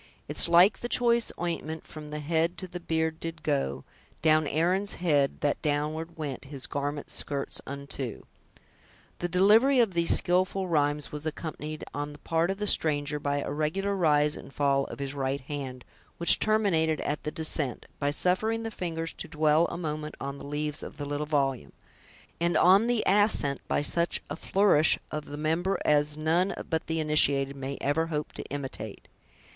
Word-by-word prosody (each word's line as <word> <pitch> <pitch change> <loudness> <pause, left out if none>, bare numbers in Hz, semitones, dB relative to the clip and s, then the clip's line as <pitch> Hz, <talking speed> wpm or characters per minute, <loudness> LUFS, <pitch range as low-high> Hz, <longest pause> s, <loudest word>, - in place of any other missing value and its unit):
It's - - +5
like 175 +4 +5
the 240 - -5
choice 235 -2 +3
ointment, 160 -2 -3
From 150 -1 -10
the 150 0 -5
head 165 +3 0
to 185 - -6
the 180 0 -7
beard 160 -1 -1
did 165 -2 -6
go; 140 - -1 0.4
Down 155 -1 +4
Aaron's 180 +7 +1
head, 145 -6 +1
that 145 - 0
downward 155 +3 -2
went 145 -4 -5
His 135 -1 -6
garment's 145 +1 -3
skirts 140 -1 -2
unto." 140 -3 -5 1.0
The 175 - -2
delivery 215 +9 +5
of 225 -6 +3
these 170 -1 +3
skillful 185 +1 +1
rhymes 150 -3 0
was 150 +1 -5
accompanied, 155 -1 -5
on 145 +1 -4
the - - -12
part 165 +3 0
of 195 - -1
the 210 - -2
stranger, 150 -5 +2
by 145 0 -1
a - - -4
regular 165 +7 -1
rise 150 -4 +3
and - - -10
fall 140 -1 +1
of - - -8
his 140 -1 -4
right 135 0 -2
hand, 130 -2 -6 0.3
which 170 - +4
terminated 180 -8 +2
at 150 - -2
the - - -3
descent, 150 -5 -1
by 145 - +1
suffering 215 +9 +1
the 225 - -4
fingers 165 -4 -4
to - - -6
dwell 155 +1 +3
a - - -5
moment 155 -2 -4
on 140 0 -5
the - - -9
leaves 150 +1 -1
of - - -8
the 145 - -4
little 145 +1 -3
volume; 135 -4 -1 0.7
and 170 +1 +2
on 195 +5 +6
the 240 -2 +1
ascent, 195 -9 +2
by - - 0
such 170 +3 +1
a - - -2
flourish 190 -6 +3
of 150 -1 -4
the 145 - -7
member 165 +5 0
as 150 0 +2
none 165 +5 +1 0.2
but 160 -1 -1
the 160 0 -1
initiated 140 -3 +2
may 135 0 -5
ever 160 +4 0
hope 150 -2 -3
to - - -6
imitate. 140 -1 -6
155 Hz, 180 wpm, -28 LUFS, 145-175 Hz, 1.0 s, on